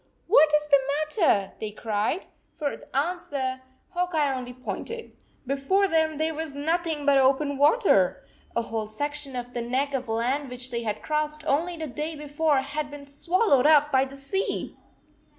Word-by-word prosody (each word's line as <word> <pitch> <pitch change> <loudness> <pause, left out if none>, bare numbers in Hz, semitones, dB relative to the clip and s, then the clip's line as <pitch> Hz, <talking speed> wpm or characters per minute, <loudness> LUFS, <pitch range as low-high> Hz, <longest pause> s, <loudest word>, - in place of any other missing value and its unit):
4 365 - -8
What 310 -9 +7
is 300 0 +1
the 280 -2 +6 0.4
matter?" 200 - +3
they 215 - -3
cried. 215 - -2 0.3
For 290 -2 -3
answer 275 -4 -2 0.3
Hawk 360 -1 -2
Eye 290 -3 +2
only 250 -1 -5
pointed. 450 - -6 0.3
Before 280 +10 +2
them 320 -3 +1
there 315 +1 0
was 315 -2 -5
nothing 320 0 -1
but 280 -1 +5
open 275 +2 +3
water! 285 - +3 0.3
A 235 - +1
whole 225 -1 -3
section 290 +4 -3
of 245 0 -5
the 240 - -2
neck 260 +4 -1
of 255 -4 -3
land 250 +5 0
which 250 0 -6
they 235 -1 -2
had 215 -2 -3
crossed 305 0 -2
only 330 +4 0
the 320 - -4
day 305 +3 -4
before 295 0 +1
had 290 +2 -4
been 290 -1 -9
swallowed 285 - +2
up 295 -1 +5
by 265 0 +4
the 275 +1 -11
sea 385 +9 -2
285 Hz, 170 wpm, -26 LUFS, 260-315 Hz, 0.4 s, What